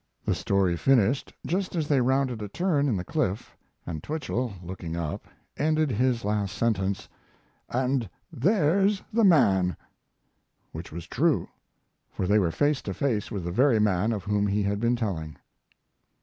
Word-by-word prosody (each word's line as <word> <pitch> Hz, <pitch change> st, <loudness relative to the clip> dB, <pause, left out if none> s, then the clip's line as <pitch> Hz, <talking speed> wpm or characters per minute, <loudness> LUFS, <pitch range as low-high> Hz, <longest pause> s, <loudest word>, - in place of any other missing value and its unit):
The -, -, +2 dB
story 95 Hz, -3 st, +1 dB
finished 130 Hz, -, +2 dB
just 185 Hz, +2 st, -1 dB
as 160 Hz, -3 st, -1 dB
they 140 Hz, -3 st, +3 dB
rounded 130 Hz, -2 st, +1 dB
a 105 Hz, -, -4 dB
turn 145 Hz, -, 0 dB
in, 110 Hz, -, +1 dB
the 90 Hz, -, -3 dB
cliff, 130 Hz, -, -2 dB, 0.3 s
and 80 Hz, -3 st, -5 dB
Twichell, 130 Hz, -, -3 dB
looking 85 Hz, -2 st, -6 dB
up, 80 Hz, -3 st, -4 dB, 0.3 s
ended 155 Hz, -1 st, +1 dB
his 120 Hz, 0 st, +1 dB
last 105 Hz, -1 st, -1 dB
sentence, 100 Hz, -4 st, 0 dB, 0.6 s
"And 125 Hz, -3 st, 0 dB, 0.2 s
there's 195 Hz, -, +2 dB
the 230 Hz, +1 st, +3 dB
man!" 95 Hz, -, +4 dB, 0.9 s
Which 80 Hz, +2 st, -8 dB
was 85 Hz, +1 st, -7 dB
true, -, -, +1 dB, 0.6 s
for 95 Hz, -, -3 dB
they 105 Hz, +3 st, +4 dB
were 90 Hz, -4 st, +2 dB
face 145 Hz, -, +1 dB
to 95 Hz, -, -5 dB
face 110 Hz, -7 st, -1 dB
with 100 Hz, -6 st, -4 dB
the 85 Hz, -, -3 dB
very 125 Hz, +4 st, +4 dB
man 105 Hz, 0 st, +2 dB
of 105 Hz, -5 st, -3 dB
whom 105 Hz, +1 st, +1 dB
he 100 Hz, +1 st, +1 dB
had 100 Hz, +1 st, -1 dB
been 120 Hz, +2 st, +2 dB
telling. 85 Hz, -, -3 dB
110 Hz, 160 wpm, -27 LUFS, 95-140 Hz, 0.9 s, man